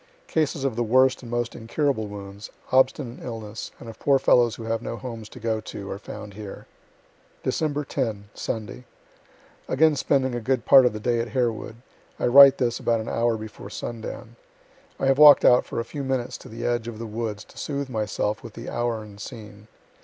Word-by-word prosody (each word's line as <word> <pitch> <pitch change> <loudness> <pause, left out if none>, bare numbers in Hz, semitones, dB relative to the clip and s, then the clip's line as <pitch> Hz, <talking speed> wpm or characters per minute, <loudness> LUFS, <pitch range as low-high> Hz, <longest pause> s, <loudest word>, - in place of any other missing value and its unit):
Cases 155 - -1
of 135 -4 0
the 120 - -1
worst 130 +3 +3
and 120 - -10
most 120 0 -2
incurable 115 -1 -1
wounds, 100 0 -9 0.2
obstinate 130 -1 +2
illness, 110 -2 -6
and 120 - -11
of 115 -1 -10
poor 140 -1 +4
fellows 120 -3 +4
who 115 - -9
have 115 0 -2
no 115 - -5
homes 115 -4 -7
to - - -12
go 110 -1 -1
to, 100 -2 -7
are 100 - -5
found 105 -1 -9
here. 105 -1 -9 0.8
Dec. 150 -2 -1
10 110 -7 -3
Sunday 115 +3 -5 0.8
Again 155 +2 +3
spending 135 -2 +1
a 120 - -3
good 130 +1 0
part 130 -2 +8
of 120 - -2
the 110 - -5
day 120 +2 0
at 115 - -1
Harewood. 115 -3 -1 0.4
I - - 0
write 135 +2 +9
this 120 -2 0
about 115 -1 +1
an 110 - -5
hour 115 -1 +1
before 110 -1 -9
sundown. 115 0 -7 0.6
I - - 0
have 135 +1 +3
walk'd 150 -1 +9
out 125 - +6
for - - -3
a 115 - -2
few 140 +4 -6
minutes 130 -2 -2
to - - -12
the 115 +1 -6
edge 120 -1 0
of 115 -2 -6
the 115 - -6
woods 110 -1 -4
to - - -14
soothe 140 -1 -3
myself 105 -2 -2
with 110 - -10
the 115 +2 -7
hour 120 -2 -1
and 105 -1 -12
scene. 105 -3 -10
120 Hz, 200 wpm, -25 LUFS, 110-130 Hz, 0.8 s, write